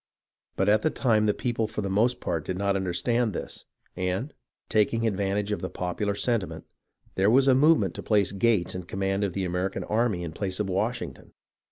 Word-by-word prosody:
But 95 - +1
at 105 +1 +4
the 155 - +2
time 110 -7 +2
the 105 - +3
people 115 -3 -1
for 105 - -4
the - - -2
most 120 +5 +2
part 85 -3 -2
did 90 +3 -4
not 100 0 +1
understand 100 +5 0
this, - - -6 0.3
and, 95 +10 -2 0.3
taking 115 +2 +2
advantage 100 0 0
of 105 - -2
the 95 - -3
popular 100 +3 -2
sentiment, 115 -3 -1 0.5
there 95 +2 +3
was 130 +4 +5
a 135 - +7
movement 135 - +4
to - - -6
place 105 -3 +2
Gates 100 -2 +1
in 90 -1 -6
command 95 +2 -1
of 100 -3 -1
the 95 0 -2
American 90 +2 -2
army 110 -5 0
in 85 - -5
place 95 +3 -4
of 105 - 0
Washington. 115 +5 -3
100 Hz, 195 wpm, -27 LUFS, 95-115 Hz, 0.5 s, a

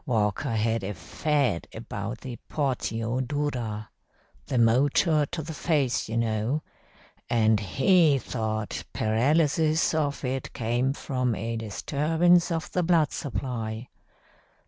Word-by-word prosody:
Walker 115 +1 0
had 110 0 0
a 100 +1 -4
fad 125 - 0
about 110 0 -5
the 125 -3 -7
portio 125 -4 -1
dura 125 -6 -3 0.6
the 130 - -1
motor 140 +6 +3
to 160 +1 -4
the 160 +2 -6
face, 145 -9 0
you 115 - -2
know 115 +6 0 0.7
and 110 -2 +3
he 145 - +4
thought 110 -4 -3
paralysis 150 +8 +2
of 145 -3 -1
it 130 0 -3
came 120 +3 0
from 125 -4 -1
a 115 +2 -3
disturbance 160 - +2
of 165 -1 -2
the 180 - +1
blood 165 -4 +3
supply. 115 -1 -4
125 Hz, 120 wpm, -27 LUFS, 110-150 Hz, 0.7 s, he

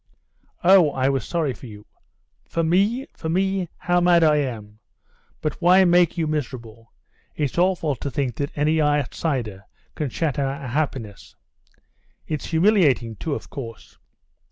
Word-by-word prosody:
"Oh, 180 -3 +6
I 135 0 +1
was 135 -4 -1
sorry 160 -6 -1
for 125 - -12
you." 105 -2 -12 0.6
"For 165 - -1
me? 200 +10 +2
for 160 - -5
me? 190 0 0
How 175 0 +1
mad 175 -1 +5
I 155 -1 +4
am!... 110 -7 -4 0.6
But 155 +4 -3
why 185 +2 +6
make 175 -1 +3
you 165 - 0
miserable? 120 -7 -5 0.4
It's 145 -4 -2
awful 175 -5 +1
to 140 - -5
think 130 -4 -2
that 140 0 -2
any 155 +2 +2
outsider 135 - -1 0.3
can 150 -3 -3
shatter 145 +1 -1
our 135 +1 -3
happiness." 125 -7 -4 0.9
"It's 155 -2 -4
humiliating 160 - +2
too, 150 +4 -3
of - - -9
course." 115 -5 -9
150 Hz, 145 wpm, -23 LUFS, 130-170 Hz, 0.9 s, Oh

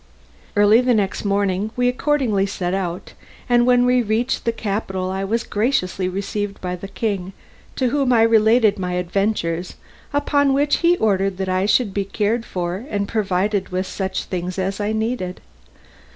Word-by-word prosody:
Early 205 +3 +5
the 250 -1 +2
next 200 -3 -1
morning 200 0 0
we 245 0 +2
accordingly 250 -6 +1
set 180 -2 -3
out, 180 -2 -3 0.3
and 240 -1 +3
when 245 0 +5
we 250 0 +3
reached 225 +3 -1
the 230 - +2
capital 195 -4 -3
I 190 +1 -2
was 225 +4 -1
graciously 200 -5 0
received 200 +1 -4
by 180 -1 -3
the 180 +2 -8
king, 195 -3 -3 0.4
to 255 -2 +1
whom 275 -1 +1
I 230 -2 +5
related 220 -1 +4
my 180 -1 -2
adventures, 180 -1 -1 0.4
upon 285 -1 +2
which 290 +1 +2
he 345 +1 +3
ordered 195 - +1
that 190 -1 -2
I 185 +2 +1
should 210 0 +2
be 200 - 0
well 195 - -7
cared 225 +2 0
for 180 +3 -3
and 200 -1 -1
provided 200 -2 0
with 185 +1 -2
such 190 0 -3
things 180 0 -4
as 195 +1 -2
I 205 +1 -1
needed. 220 -4 -2
205 Hz, 170 wpm, -21 LUFS, 190-235 Hz, 0.4 s, Early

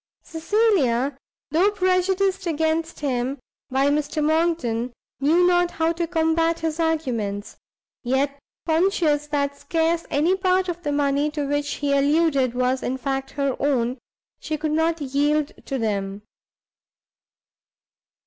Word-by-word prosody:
Cecilia, 320 - +1 0.4
though 350 +6 +4
prejudiced 375 0 +1
against 320 0 -1
him 260 -1 -1 0.3
by 270 +2 +2
Mr 295 +1 0
Monckton, 305 -8 0 0.3
knew 320 +6 +4
not 355 0 +3
how 325 -1 0
to 340 0 -2
combat 325 0 +1
his 325 0 -2
arguments; 240 -11 -1 0.5
yet 270 +3 0 0.3
conscious 320 -3 +2
that 280 -1 -1
scarce 330 +3 -1
any 325 +6 +2
part 375 -1 +1
of 350 -1 -4
the 295 -4 -2
money 285 0 +1
to 295 -1 -3
which 290 +1 -1
he 285 -1 -1
alluded 280 -3 +2
was 255 +1 +1
in 260 - -2
fact 270 0 -3
her 275 -2 -1
own, 255 -3 0 0.4
she 310 - -3
could 305 0 -2
not 325 +1 +1
yield 290 +2 +1 0.2
to 270 - -2
them. 200 -3 -2
300 Hz, 130 wpm, -23 LUFS, 275-330 Hz, 0.5 s, though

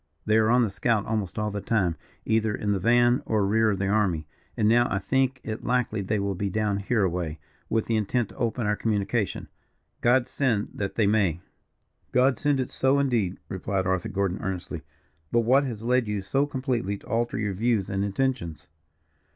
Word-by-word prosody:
They 110 0 +3
are 110 0 +3
on 120 +1 +5
the 110 - -1
scout 110 +1 0
almost 110 -4 -2
all 105 -1 -1
the 100 0 -4
time, 95 -8 +1 0.3
either 110 -1 +1
in 105 - -2
the 100 - +1
van 120 +4 +4
or 105 -3 +2
rear 110 +2 +3
of 100 - 0
the 95 - -1
army; 95 -7 +1 0.3
and 105 - +2
now 120 +2 +4
I 100 - +1
think 130 +5 0
it 110 0 -5
likely 125 -4 0
they 105 +3 -1
will 100 0 -1
be 100 +2 -2
down 105 0 0
here 100 +2 0
away, 85 -4 -2 0.3
with 115 -1 +1
the 115 - 0
intent 110 +2 0
to - - -15
open 120 0 -1
our 105 0 +1
communication. 105 0 -1 0.5
God 120 +1 +3
send 115 -7 0
that 100 -1 -4
they 110 - +2
may." 100 -5 +2 0.7
"God 130 +1 +3
send 145 -2 +1
it 130 - -2
so, 135 +1 +2
indeed," 120 -10 +1
replied 95 0 -2
Arthur 95 -1 0
Gordon, 95 -1 -1
earnestly. 90 -4 -4 0.5
"But 120 - +3
what 130 +5 +3
has 115 -4 -5
led 125 0 +2
you 105 -2 -2
so 135 +8 +1
completely 130 -8 -2
to - - -18
alter 120 +2 -1
your 105 -2 -1
views 110 0 +1
and 100 0 -1
intentions?" 100 - -2
110 Hz, 200 wpm, -26 LUFS, 100-120 Hz, 0.7 s, on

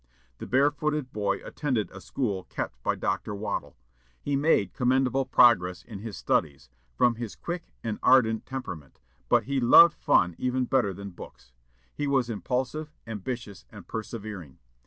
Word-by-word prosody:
The - - -7
barefooted 145 +1 +1
boy 100 -2 -1
attended 130 -8 -2
a 95 - -10
school 100 -8 -3
kept 60 - -5
by - - 0
Dr. 105 - -2
Waddell. 105 +2 -4 0.4
He 140 - -2
made 135 - +2
commendable 130 +1 +1
progress 90 -8 +4
in 110 -5 -9
his 110 0 -7
studies, 70 -5 -1 0.2
from 120 - +4
his 115 -3 -6
quick 175 0 -6
and 110 -2 -3
ardent 115 -4 +4
temperament, 95 - -7 0.3
but 120 -2 +4
he 135 +4 -1
loved 130 +7 +8
fun 85 0 +2
even 130 0 0
better 120 -6 +1
than 100 +1 -8
books. 65 -7 -13 0.4
He 145 - -3
was 130 -4 +1
impulsive, 130 - -3
ambitious, 110 -2 -6
and - - -12
persevering. 105 - -7
115 Hz, 150 wpm, -27 LUFS, 100-130 Hz, 0.4 s, loved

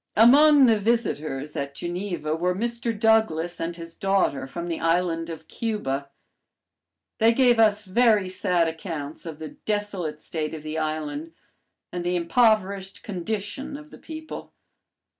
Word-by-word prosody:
Among 280 +5 +7
the 225 -3 +4
visitors 155 - -1
at 140 0 -4
Geneva 175 -3 -3
were 180 +2 0
Mr. 230 +1 -2
Douglass 175 -7 +2
and 165 +1 -3
his 165 -1 -8
daughter 195 -8 +1
from 170 +5 -5
the 165 -2 -3
island 165 0 +1
of 160 -1 -8
Cuba. 140 - -3 1.1
They 225 +1 +6
gave 245 -2 +4
us 215 -1 +4
very 210 -1 +3
sad 180 -2 +1
accounts 160 -2 -6
of 160 -2 -6
the 155 -1 -7
desolate 200 -7 -3
state 155 0 -4
of 155 - -9
the 155 +1 -3
island 155 0 -3 0.6
and 175 -1 -4
the 175 +1 0
impoverished 195 0 +1
condition 210 - -4
of 295 +1 -13
the - - -12
people. 315 0 -8
180 Hz, 140 wpm, -25 LUFS, 160-220 Hz, 1.1 s, Among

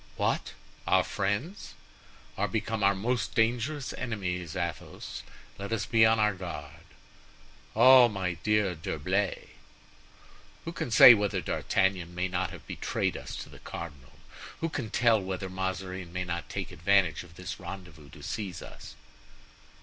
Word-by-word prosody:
"What! - - 0 0.3
our 95 -1 +4
friends?" 100 - -3 0.6
"Are 100 - 0
become 110 +1 -2
our 100 0 +4
most 120 +5 -1
dangerous 125 +5 0
enemies, 90 -7 -4
Athos. 85 -1 -5 0.4
Let 100 +2 -5
us 115 - 0
be 110 -1 +5
on 110 0 +4
our 105 -1 +3
guard." 85 -6 -8 0.9
"Oh! 125 +2 +8
my 95 -4 -2
dear 105 -3 +2
D'Herblay!" 90 +5 -2 1.2
"Who 165 - -3
can 170 - -4
say 120 +2 +10
whether 105 -2 0
D'Artagnan 95 -3 0
may 90 +1 0
not 90 -1 -1
have - - -11
betrayed - - -2
us - - -7
to - - -14
the - - -13
cardinal? 75 -6 -8 0.5
who 165 - -1
can 130 -8 -4
tell 115 -1 +3
whether 95 0 -4
Mazarin 95 -1 -4
may 90 +1 -2
not 85 -1 -4
take - - -4
advantage 90 -1 +2
of 85 -2 -14
this 90 +1 -6
rendezvous 85 -5 -9
to - - -13
seize 95 -7 -4
us?" - - -11
95 Hz, 145 wpm, -29 LUFS, 90-110 Hz, 1.2 s, say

